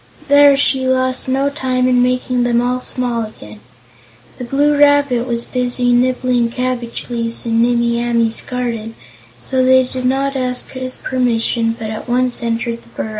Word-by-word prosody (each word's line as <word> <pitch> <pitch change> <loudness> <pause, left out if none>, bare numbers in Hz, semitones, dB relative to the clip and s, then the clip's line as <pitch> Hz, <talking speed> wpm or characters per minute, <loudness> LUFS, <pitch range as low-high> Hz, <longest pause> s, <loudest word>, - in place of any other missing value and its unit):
There 285 -1 +6
she 265 -2 +1
lost 260 0 0
no 270 +2 +1
time 255 -3 -1
in 250 -1 +3
making 250 0 0
them 240 -1 +2
all 250 +1 0
small 250 -2 -3
again. 105 - -11 0.8
The - - -5
Blue 285 +4 +1
Rabbit 285 -4 +3
was 235 -1 -1
busy 245 -1 0
nibbling 250 -1 +1
cabbage 245 -1 -3
leaves 230 0 -1
in 230 0 +1
Nimmie 235 0 +1
Amee's 235 -1 0
garden, 230 -3 -4 0.5
so 260 -1 0
they 260 0 +5
did 255 0 -5
not 275 +2 0
ask 250 -1 -3
his 255 -1 -6
permission 230 -2 0
but 220 -1 -5
at 220 +3 -7
once 250 0 0
entered 235 0 -2
the - - -21
burrow. 220 - -5
250 Hz, 165 wpm, -16 LUFS, 235-260 Hz, 0.8 s, There